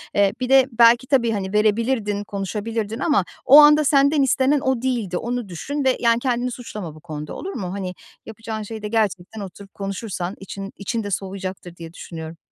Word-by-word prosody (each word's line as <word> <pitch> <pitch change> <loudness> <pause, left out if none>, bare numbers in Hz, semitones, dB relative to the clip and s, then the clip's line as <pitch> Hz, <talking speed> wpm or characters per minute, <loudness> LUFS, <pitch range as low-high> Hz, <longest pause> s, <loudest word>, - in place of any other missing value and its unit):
Eee, 200 -1 +3
bir 255 0 -2
de 270 -1 +6
belki 235 +2 +5
tabii, 245 -5 +2
hani, 195 -2 -3
verebilirdin, 210 -1 +1
konuşabilirdin 210 +3 -4
ama 280 - +2 0.2
o 285 +3 +9
anda 300 +1 +7
senden 280 +1 +4
istenen 270 +2 +3
o 260 -3 0
değildi. 230 -9 -1
Onu 240 -3 -3
düşün 280 - -4
ve, 260 - +3
yani, 235 0 +3
"Kendini 250 -1 -1
suçlama 210 -10 -7
bu - - -13
konuda. 150 -2 -7
Olur 390 +2 -6
mu?" 185 -4 -4
Hani, 185 -2 -4 0.3
yapacağın 220 -1 -6
şey 220 +1 -7
de 210 - -4
gerçekten 210 -2 -1
oturup 195 +1 -10
konuşursan 195 -2 -4
için 195 +1 -7
için 225 +3 -3
de 205 - -5
soğuyacaktır 190 -2 -5
diye 165 -1 -10
düşünüyorum. 160 -2 -8
215 Hz, 180 wpm, -22 LUFS, 195-250 Hz, 0.3 s, o